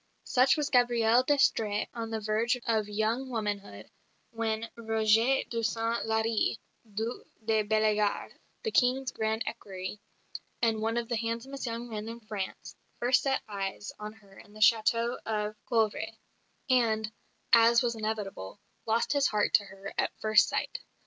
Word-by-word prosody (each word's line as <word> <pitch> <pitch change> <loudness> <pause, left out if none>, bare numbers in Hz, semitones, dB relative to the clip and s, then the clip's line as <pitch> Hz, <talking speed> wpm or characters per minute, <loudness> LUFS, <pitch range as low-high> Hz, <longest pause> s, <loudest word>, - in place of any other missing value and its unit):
Such 260 +2 +3
was 295 -1 -1
Gabrielle 240 -2 +4
d'Estrées 225 -6 +2
on 230 -1 -4
the 225 -1 -2
verge 220 +3 +1
of 220 -2 +1
young 220 +5 -1
womanhood 210 -4 -4 0.4
when 225 0 -2
Roger 225 +3 +2
de 230 -1 -3
Saint 230 +1 -1
Larry, 220 0 +1 0.3
Duc 225 +4 -4 0.2
de 220 -1 +3
Bellegarde, 215 -1 +1 0.3
the 445 - -1
King's 255 -2 +2
grand 220 0 -1
equerry, 195 -3 -6 0.6
and 225 -2 +1
one 225 +1 0
of 235 -1 -1
the 235 - -1
handsomest 235 +4 -4
young 235 +1 -4
men 215 -1 -5
in 230 +1 -7
France, 210 -4 -6 0.2
first 245 +2 +3
set 270 -1 0
eyes 200 0 -4
on 210 0 -6
her 200 -3 -18
in 205 - -16
the 215 - -12
château 230 +2 +3
of 215 -1 -2
Coeuvres; 220 -2 0 0.5
and, 220 -4 +2 0.4
as 235 +1 +7
was 235 -1 +1
inevitable, 215 - -4 0.3
lost 225 +5 +1
his 280 -2 +3
heart 210 -1 +1
to 205 - +5
her 195 0 -9
at - - -1
first 215 -1 +4
sight. - - -2
225 Hz, 150 wpm, -29 LUFS, 215-235 Hz, 0.6 s, as